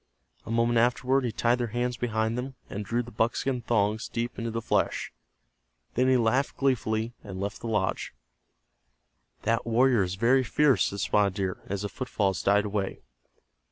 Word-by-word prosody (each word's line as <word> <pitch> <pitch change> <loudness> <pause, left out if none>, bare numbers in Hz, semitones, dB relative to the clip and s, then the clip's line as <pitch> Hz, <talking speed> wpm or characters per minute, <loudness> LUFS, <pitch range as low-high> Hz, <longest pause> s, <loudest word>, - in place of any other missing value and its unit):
A - - -7
moment 115 0 +2
afterward 125 +3 +2
he 120 - -1
tied 120 +2 +1
their 120 - 0
hands 125 0 0
behind 110 -1 -1
them, 130 +2 -4 0.2
and 105 - -4
drew 120 +4 -1
the 120 - -11
buckskin 120 +3 0
thongs 110 -1 0
deep 120 +1 -3
into 115 0 -2
the 115 0 -2
flesh. - - -1 0.8
Then 125 +2 +2
he 130 -1 +5
laughed 125 +4 +1
gleefully, 115 -4 0
and 95 -3 -7
left 100 +1 -4
the 115 - -5
lodge. 105 -4 -1 1.3
"That 115 +1 +1
warrior 120 0 +4
is 90 -1 -1
very 125 +6 +3
fierce," 145 +1 +3
said 100 0 -3
Spotted 100 -2 +2
Deer, 95 -2 -2
as 100 +1 -3
the - - -1
footfalls 100 -9 -1
died 105 +1 +3
away. 100 -2 -3
115 Hz, 170 wpm, -27 LUFS, 105-125 Hz, 1.3 s, he